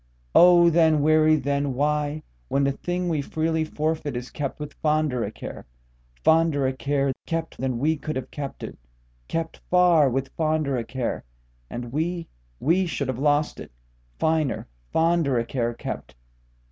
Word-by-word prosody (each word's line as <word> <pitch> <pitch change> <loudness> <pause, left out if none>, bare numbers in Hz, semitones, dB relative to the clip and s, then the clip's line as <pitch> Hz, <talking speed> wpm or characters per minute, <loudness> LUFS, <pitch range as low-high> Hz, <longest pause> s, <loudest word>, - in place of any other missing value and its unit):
O 175 -1 +7
then, 160 -3 +4
weary 155 0 +5
then 140 -2 -1
whyWhen 145 - -1
the 140 - +2
thing 175 +5 -3
we 160 -4 0
freely 160 +2 -1
fórfeit 155 -2 -2
is 120 0 -5
kept 145 -1 -4
with 150 -1 -6
fonder 150 -5 +1
a - - -2
care, - - -9 0.6
Fonder 160 -3 +3
a 130 - +1
care 140 +1 0
kept 165 0 -3
than 130 -2 -1
we 155 +5 +1
could 155 +1 -5
have 130 - -5
kept 140 -2 -6
it, - - -7 0.5
keptFar 165 -2 +2
with 135 +1 -2
fonder 155 -3 0
a 120 - -1
care 120 +1 -3 0.5
(and 120 -1 -6
we, 170 +3 -2 0.3
we 180 +4 +2
should 140 -5 -3
have 130 -1 -2
lost 145 +1 +1
it) - - -9 0.5
finer, 160 -4 0 0.2
fonderA 160 -8 +2
care 120 -3 -1
kept. 65 - -6
150 Hz, 150 wpm, -25 LUFS, 135-160 Hz, 0.6 s, O